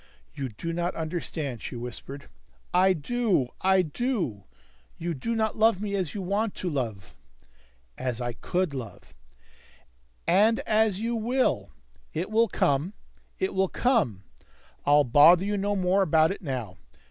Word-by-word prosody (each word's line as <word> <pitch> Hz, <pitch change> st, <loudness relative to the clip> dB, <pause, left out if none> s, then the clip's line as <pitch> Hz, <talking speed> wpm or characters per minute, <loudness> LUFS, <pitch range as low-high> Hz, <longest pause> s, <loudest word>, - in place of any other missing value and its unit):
"You 135 Hz, -2 st, -4 dB
do 165 Hz, +10 st, -5 dB
not 175 Hz, +1 st, -2 dB
understand," 155 Hz, -6 st, -4 dB
she -, -, -6 dB
whispered. 125 Hz, +4 st, -7 dB, 0.5 s
"I 185 Hz, +1 st, +5 dB
do. 185 Hz, -, 0 dB
I 190 Hz, 0 st, +4 dB
do. 170 Hz, -, -2 dB, 0.5 s
You 170 Hz, 0 st, -3 dB
do 230 Hz, -, -3 dB
not 220 Hz, -1 st, -1 dB
love 220 Hz, -3 st, +4 dB
me 205 Hz, -1 st, -3 dB
as 185 Hz, -4 st, -2 dB
you 200 Hz, -, -3 dB
want 200 Hz, +3 st, -1 dB
to 180 Hz, -, -3 dB
love." 115 Hz, -9 st, -4 dB, 0.9 s
"As 125 Hz, -2 st, -2 dB
I 120 Hz, -1 st, -3 dB
could 175 Hz, +5 st, -2 dB
love 125 Hz, -6 st, -8 dB, 0.6 s
" -, -, -34 dB, 0.2 s
"And 225 Hz, 0 st, +1 dB
as 215 Hz, -3 st, +2 dB
you 230 Hz, +2 st, -1 dB
will! 230 Hz, -, 0 dB, 0.5 s
It 175 Hz, +6 st, -3 dB
will 230 Hz, +1 st, +4 dB
come. 150 Hz, 0 st, 0 dB, 0.4 s
It 190 Hz, -, -1 dB
will 190 Hz, -1 st, +1 dB
come. 210 Hz, -, +1 dB, 0.6 s
I'll 145 Hz, 0 st, +6 dB
bother 155 Hz, +8 st, +6 dB
you 205 Hz, +1 st, -1 dB
no 205 Hz, +1 st, 0 dB
more 190 Hz, +1 st, +2 dB
about 160 Hz, -3 st, +4 dB
it 195 Hz, -, -6 dB
now. 125 Hz, -, -4 dB
175 Hz, 150 wpm, -27 LUFS, 130-205 Hz, 0.9 s, I'll